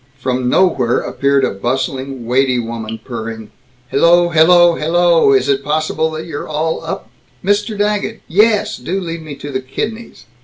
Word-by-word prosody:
From 125 -1 -1
nowhere 130 -9 +2
appeared 140 -1 +1
a - - -1
bustling 130 +4 -3
weighty 130 +1 +2
woman, 115 -1 -5
purring, 110 -2 -6 0.4
"Hello, 175 +4 +4
hello, 175 +2 +5
hello, 165 -1 +3
is 130 -1 +3
it 140 0 +1
possible 155 +1 0
that 160 0 -6
you're 150 -4 -6
all 155 +1 -2
up - - -6 0.3
Mr. 205 +2 0
Daggett. 210 +2 -1
Yes, 210 +4 +2
do 175 +10 -3
lead 165 -3 -5
me 155 -2 -8
to 145 +1 -8
the 130 -1 -2
kidneys." 220 - -6
150 Hz, 155 wpm, -16 LUFS, 130-175 Hz, 0.4 s, hello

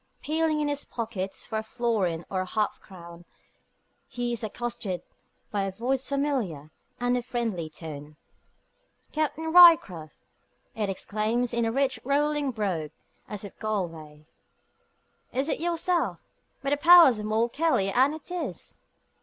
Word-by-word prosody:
Peeling 315 0 +1
in 295 - 0
his 290 0 -2
pockets 215 -5 -5
for 220 - -2
a - - -5
florin 220 -8 -1
or 190 -1 -2
a - - -3
half 215 +2 -1
crown, 170 -2 -12 0.8
he 245 -1 -3
is 235 - -4
accosted 220 -4 -4 0.5
by 205 - 0
a 195 - -1
voice 255 +6 -2
familiar 250 - -2 0.3
and 245 0 +1
of 245 - -1
friendly 230 -10 -3
tone. 150 -2 -9 1.0
"Captain 315 +1 -2
Ryecroft!" 320 - +7 0.6
it 210 -3 -2
exclaims 215 +5 -1
in 235 -1 +1
a 225 - 0
rich 265 -1 0
rolling 290 +1 +1
brogue, 190 -10 -2 0.4
as 210 -1 -6
of 200 - -9
Galway. 165 -8 -4 1.1
"Is 265 +3 -1
it - - -1
yourself? 345 +1 0 0.5
By 275 - -1
the 290 - +3
powers 330 -7 +8
of 210 - -4
Moll 220 +2 +2
Kelly, 275 -9 +1
and 265 +7 +3
it 315 +3 -10
is." 360 -1 -5
230 Hz, 145 wpm, -27 LUFS, 190-280 Hz, 1.1 s, powers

